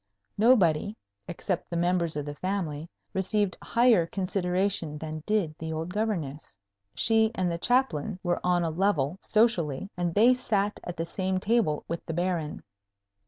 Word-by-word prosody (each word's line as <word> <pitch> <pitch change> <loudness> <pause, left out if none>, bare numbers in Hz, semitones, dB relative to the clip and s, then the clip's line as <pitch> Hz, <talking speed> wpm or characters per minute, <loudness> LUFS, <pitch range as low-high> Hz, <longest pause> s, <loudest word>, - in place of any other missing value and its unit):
Nobody, 205 -4 +3 0.3
except 175 +1 -3
the 170 - -2
members 170 -2 +1
of 145 - -3
the 145 - -5
family, 165 -2 -3 0.2
received 195 +1 0
higher 230 -8 +3
consideration 180 -3 -1
than 155 0 -6
did 205 -8 +1
the 160 0 -4
old 160 +3 -4
Governess. 165 - -3 0.4
She 225 -1 +3
and 185 -3 0
the 170 - -3
Chaplain 215 - +1
were 175 -1 0
on 180 -1 +2
a 165 - -1
level, 175 -2 0
socially, 200 - +1
and 175 -1 -2
they 235 +5 +6
sat 210 -5 -1
at 175 - -6
the 165 - -2
same 185 +2 -1
table 200 -7 +1
with 170 - -4
the 165 - -3
Baron. 175 -3 -2
180 Hz, 155 wpm, -28 LUFS, 160-205 Hz, 0.4 s, they